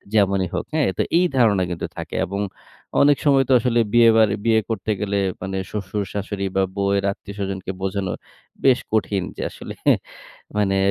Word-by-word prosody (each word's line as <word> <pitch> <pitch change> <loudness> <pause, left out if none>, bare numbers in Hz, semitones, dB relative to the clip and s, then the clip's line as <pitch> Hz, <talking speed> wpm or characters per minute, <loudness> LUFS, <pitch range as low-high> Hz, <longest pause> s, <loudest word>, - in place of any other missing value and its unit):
যেমনই 100 -2 +3
হোক, - - -2
হ্যাঁ, 155 -7 +2
তো - - +4 0.2
এই 180 - +4
ধারণা 105 -6 +4
কিন্তু 85 - -3
থাকে। - - -6
এবং 100 +3 -3 0.6
অনেক 145 0 +5
সময় 135 -2 +4
তো 130 - +5
আসলে 120 0 +1
বিয়ে 120 -1 +7
বার 110 -2 +5 0.2
বিয়ে 110 -1 +4
করতে 110 -1 -2
গেলে 100 -1 0 0.2
মানে 95 +1 -3
শ্বশুর-শ্বাশুড়ি 100 0 -3
বা 95 - +3
বউয়ের 100 0 +1
আত্মীয়স্বজনকে 100 -2 -5
বোঝানো 95 -1 -2 0.5
বেশ 130 -2 +5
কঠিন 100 -3 +1
যে, - - -3
আসলে - - -9 0.8
মানে 95 -2 +2
100 Hz, 160 wpm, -22 LUFS, 95-115 Hz, 0.8 s, বিয়ে